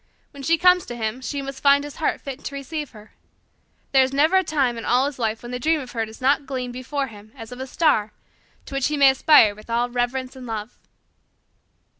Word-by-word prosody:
When 280 Hz, -, -11 dB
she 330 Hz, +4 st, +2 dB
comes 360 Hz, 0 st, +4 dB
to 240 Hz, -, -6 dB
him 225 Hz, +2 st, -3 dB
she 275 Hz, +2 st, -4 dB
must 275 Hz, 0 st, -7 dB
find 280 Hz, 0 st, +5 dB
his 290 Hz, -1 st, -9 dB
heart 320 Hz, -, -1 dB
fit 275 Hz, 0 st, -8 dB
to 280 Hz, -, -5 dB
receive 295 Hz, +2 st, -5 dB
her. 215 Hz, -1 st, -16 dB, 0.8 s
There 270 Hz, -, +5 dB
is 260 Hz, 0 st, +1 dB
never 310 Hz, +7 st, +3 dB
a 375 Hz, -, +3 dB
time 275 Hz, -8 st, 0 dB
in 230 Hz, -, -6 dB
all 250 Hz, +3 st, +2 dB
his 280 Hz, -2 st, -5 dB
life 225 Hz, -1 st, -2 dB
when 240 Hz, -, -7 dB
the 250 Hz, -, -4 dB
dream 315 Hz, +4 st, +1 dB
of 255 Hz, -3 st, -8 dB
her 225 Hz, -2 st, -2 dB
does 220 Hz, -, -13 dB
not 275 Hz, +2 st, +1 dB
gleam 255 Hz, -2 st, -4 dB
before 260 Hz, +3 st, -3 dB
him 215 Hz, -3 st, -13 dB
as 225 Hz, -3 st, -10 dB
of 250 Hz, -, -9 dB
a 260 Hz, -, -5 dB
star 255 Hz, -9 st, +1 dB, 0.5 s
to -, -, -10 dB
which 275 Hz, -1 st, +1 dB
he 300 Hz, 0 st, -2 dB
may 275 Hz, -1 st, +7 dB
aspire 265 Hz, -6 st, +5 dB
with 215 Hz, +2 st, -16 dB
all 240 Hz, +1 st, 0 dB
reverence 250 Hz, +2 st, -2 dB
and 255 Hz, -2 st, -10 dB
love." 220 Hz, 0 st, -6 dB
260 Hz, 235 wpm, -23 LUFS, 240-285 Hz, 0.8 s, may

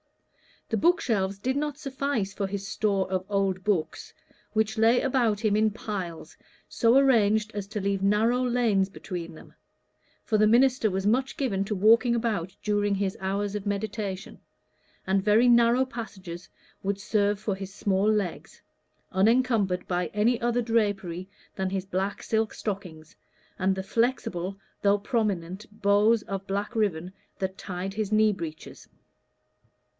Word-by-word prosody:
The 225 Hz, -, 0 dB
bookshelves 210 Hz, -, +1 dB
did 260 Hz, +7 st, -1 dB
not 295 Hz, -1 st, -2 dB
suffice 275 Hz, -8 st, -2 dB
for 200 Hz, -1 st, -2 dB
his 195 Hz, 0 st, -5 dB
store 200 Hz, -2 st, 0 dB
of 185 Hz, 0 st, -1 dB
old 195 Hz, -2 st, 0 dB
books, 190 Hz, -6 st, -2 dB, 0.4 s
which 220 Hz, 0 st, 0 dB
lay 225 Hz, +3 st, +4 dB
about 240 Hz, -6 st, +1 dB
him 210 Hz, -2 st, +2 dB
in 215 Hz, +1 st, +3 dB
piles 195 Hz, -6 st, -6 dB, 0.3 s
so 235 Hz, +2 st, +3 dB
arranged 220 Hz, -5 st, +3 dB
as 200 Hz, -1 st, -4 dB
to 210 Hz, 0 st, -4 dB
leave 195 Hz, 0 st, -1 dB
narrow 220 Hz, +5 st, +2 dB
lanes 235 Hz, -6 st, +2 dB
between 175 Hz, -4 st, -7 dB
them; -, -, -15 dB, 0.7 s
for 215 Hz, -, +1 dB
the 215 Hz, -, +5 dB
minister 245 Hz, 0 st, +4 dB
was 190 Hz, 0 st, -2 dB
much 255 Hz, +5 st, +1 dB
given 205 Hz, -8 st, 0 dB
to 210 Hz, -, -2 dB
walking 230 Hz, +5 st, +4 dB
about 210 Hz, -6 st, -2 dB
during 205 Hz, -1 st, +1 dB
his 195 Hz, -1 st, -1 dB
hours 195 Hz, +1 st, -2 dB
of 210 Hz, -1 st, -4 dB
meditation, 200 Hz, -1 st, -4 dB, 0.7 s
and 190 Hz, +1 st, +2 dB
very 215 Hz, +4 st, +4 dB
narrow 235 Hz, +2 st, +5 dB
passages 190 Hz, -9 st, -8 dB, 0.3 s
would 200 Hz, 0 st, -2 dB
serve 205 Hz, 0 st, +1 dB
for 210 Hz, -1 st, -2 dB
his 190 Hz, 0 st, -7 dB
small 200 Hz, +1 st, +1 dB
legs, 205 Hz, -5 st, -2 dB, 0.5 s
unencumbered 205 Hz, -2 st, +2 dB
by 180 Hz, -1 st, 0 dB
any 230 Hz, +3 st, +2 dB
other 240 Hz, +1 st, +1 dB
drapery 200 Hz, -6 st, -1 dB, 0.3 s
than 190 Hz, -1 st, -2 dB
his 190 Hz, 0 st, -3 dB
black 195 Hz, +1 st, -3 dB
silk 220 Hz, -1 st, 0 dB
stockings 180 Hz, -7 st, -6 dB, 0.4 s
and 190 Hz, +1 st, +2 dB
the 190 Hz, -, -4 dB
flexible, 200 Hz, -4 st, -1 dB, 0.2 s
though 200 Hz, 0 st, +4 dB
prominent, 200 Hz, -4 st, -2 dB, 0.2 s
bows 210 Hz, +2 st, +4 dB
of 195 Hz, 0 st, -5 dB
black 200 Hz, +4 st, -3 dB
ribbon 185 Hz, -5 st, 0 dB, 0.3 s
that 190 Hz, 0 st, -3 dB
tied 185 Hz, 0 st, -5 dB
his 215 Hz, 0 st, -3 dB
knee 215 Hz, 0 st, +4 dB
breeches. 165 Hz, -5 st, -8 dB
205 Hz, 150 wpm, -27 LUFS, 190-225 Hz, 0.7 s, the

